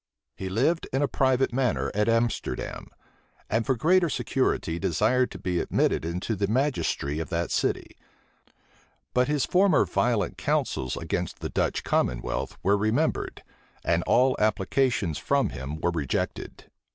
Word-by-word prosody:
He 95 - -5
lived 160 - +1
in 135 +2 +1
a - - +2
private 130 -2 +1
manner 125 -3 0
at 105 +2 +1
Amsterdam; 115 0 -1 0.6
and 115 +1 +1
for 130 - +2
greater 175 +7 +3
security 130 - -1
desired 110 +10 +2
to - - -8
be 90 -2 -1
admitted - - +1
into 90 +6 -2
the 100 0 0
magistracy 115 - 0
of 80 - -4
that 85 0 -2
city: - - -1 1.2
but 125 0 +3
his 150 -2 +1
former 185 -3 +4
violent 115 -7 0
counsels 65 -1 -1
against - - -3
the - - -5
Dutch - - -1
commonwealth - - -1
were 100 +3 +3
remembered; 110 +10 0 0.4
and - - +2
all 130 +1 +4
applications 105 - +1
from - - +1
him 65 +5 -6
were 85 - +1
rejected. 75 -6 -3
110 Hz, 140 wpm, -26 LUFS, 85-130 Hz, 1.2 s, former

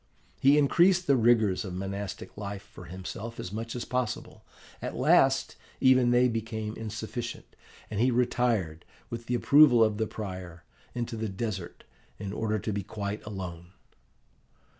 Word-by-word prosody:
He 140 +2 +5
increased 175 +5 +4
the 140 - +4
rigours 110 -5 +3
of 95 -3 -6
monastic 95 +1 -5
life 100 -1 -6
for 90 - -13
himself 95 +6 -7
as 90 - -5
much 115 +2 -5
as 120 - -4
possible. 125 -3 -3 0.4
At - - -4
last, - - +3 0.2
even 130 -2 +5
they 120 +1 +5
became 110 -2 -3
insufficient, 110 +2 -5 0.4
and 105 - -4
he 125 +3 +4
retired, 120 -9 0 0.3
with 115 0 -6
the 125 - 0
approval 135 -2 +6
of 110 -1 +1
the 110 - 0
prior, 90 -5 -7 0.3
into 120 -1 -3
the 110 -1 -3
desert, 95 -3 -5 0.3
in 100 -1 -5
order 110 0 -1
to 105 +1 -3
be 100 - -1
quite 100 +1 -5
alone. 90 -3 -7
110 Hz, 150 wpm, -28 LUFS, 100-120 Hz, 0.4 s, approval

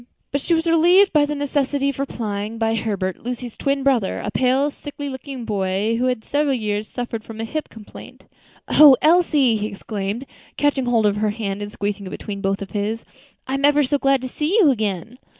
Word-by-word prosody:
But 280 - -1
she 335 - +1
was 325 +1 -1
relieved 350 +4 +5
from 295 -2 +3
the 295 - -2
necessity 280 -1 0
of 275 - -5
replying 220 -5 -4
by 225 0 +1
Herbert, 200 -4 -2
Lucy's 245 -1 -5
twin 275 0 -1
brother, 250 -8 +1
a 205 - -4
pale, 260 +5 +2
sickly 285 0 -7
looking 260 -2 -7
boy, 200 +2 0
who 250 - +1
had 250 -3 -1
for - - -25
several 285 -1 +1
years 210 -2 -2
been - - -27
a - - -28
sufferer 245 -2 -3
from 220 0 -11
hip 305 +7 -4
complaint. 220 -2 -13 0.4
"O 290 -4 +8
Elsie!" 305 -8 +4
he 210 0 -2
exclaimed, 205 +3 -5 0.3
catching 285 -3 +1
hold 235 -3 +2
of 205 0 +2
her 215 0 +1
hand 205 -2 -4
and 205 0 -5
squeezing 205 -1 -4
it - - -6
between 200 +1 -6
both 195 0 -1
of 195 - -11
his, 215 +2 -3 0.4
"I'm 275 +1 -2
ever 290 +1 +5
so 285 +2 0
glad 275 -1 +2
to - - -2
see 305 - -1
you 345 -10 +6
again." 215 0 -3
245 Hz, 210 wpm, -21 LUFS, 210-285 Hz, 0.4 s, O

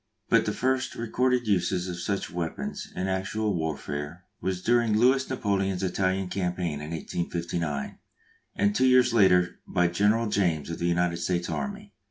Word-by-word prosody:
But - - +4
the - - +2
first 130 0 0
recorded 125 +2 0
uses 95 -2 +1
of 90 -1 -5
such 100 +3 -2
weapons 85 -2 -4
in 95 - -2
actual 100 +3 -1
warfare 80 +1 -4 0.2
was 90 0 -2
during 120 -2 +3
Louis 130 +3 +3
Napoleon's 95 -6 -1
Italian 95 0 0
campaign 90 -5 -2
in 75 - -6
1859, 85 -2 -3 0.6
and 100 +1 +1
two 130 - +4
years 125 -2 +5
later 90 -5 +4
by 90 0 +2
General 105 +6 +2
James 85 -7 0
of 85 - -5
the 85 - 0
United 85 0 +1
States 85 0 -1
Army. 205 0 -5
95 Hz, 155 wpm, -27 LUFS, 85-110 Hz, 0.6 s, years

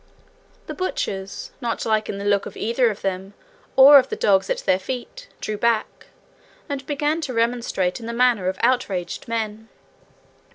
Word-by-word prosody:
The - - -6
butchers, 195 - -4
not 235 -2 -2
liking 215 -2 0
the 200 - -6
look 205 -1 +1
of - - -10
either 235 +2 +1
of 210 - -7
them 195 +1 -3 0.4
or 275 +2 +10
of 260 - -2
the - - -2
dogs 195 -2 +2
at - - 0
their 185 - +3
feet, 260 - -7
drew 215 -1 -4
back, 235 -2 0 0.6
and 280 -3 -4
began 295 +2 0
to 260 -6 -4
remonstrate 230 -6 0
in 230 - -8
the - - -3
manner 235 -5 +2
of 190 0 -1
outraged 220 -9 0
men. 220 -1 -4
230 Hz, 165 wpm, -22 LUFS, 200-255 Hz, 0.6 s, or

